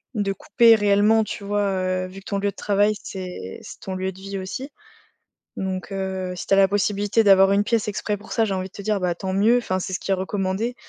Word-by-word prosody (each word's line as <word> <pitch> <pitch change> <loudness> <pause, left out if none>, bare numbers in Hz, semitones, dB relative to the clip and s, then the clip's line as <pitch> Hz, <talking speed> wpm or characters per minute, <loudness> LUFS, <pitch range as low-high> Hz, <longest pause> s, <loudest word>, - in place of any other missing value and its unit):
de 200 -2 0
couper 230 +4 +5
réellement, 205 +1 +3
tu 210 - -6
vois? 205 +1 0
Heu, 185 -1 -1
vu 185 +1 -10
que 195 - -19
ton 200 - -2
lieu 200 0 0
de - - -28
travail, 205 +1 +2
c'est 180 - -7
c'est - - -10
ton 190 - -5
lieu 190 0 -2
de 190 - -15
vie 195 0 -5
aussi. 195 +9 -5 0.9
Donc, 190 0 -4
heu, 190 -1 -3
si 180 - -7
tu - - +4
as - - +3
la 195 0 +6
possibilité 205 +2 +1
d'avoir 195 -1 +6
une 200 +1 +3
pièce 225 +1 0
exprès 210 0 -2
pour 205 +2 -12
ça, 225 - +2
j'ai 200 -3 -1
envie 185 0 -3
de - - -33
te 200 - -8
dire, 210 0 0
bah, 180 -2 0
tant 190 +2 -4
mieux, 215 +6 +4
enfin, 185 -6 -2
c'est 190 - -5
ce 180 - -2
qui - - -5
est - - +4
recommandé. 195 +4 -2
195 Hz, 255 wpm, -23 LUFS, 190-205 Hz, 0.9 s, la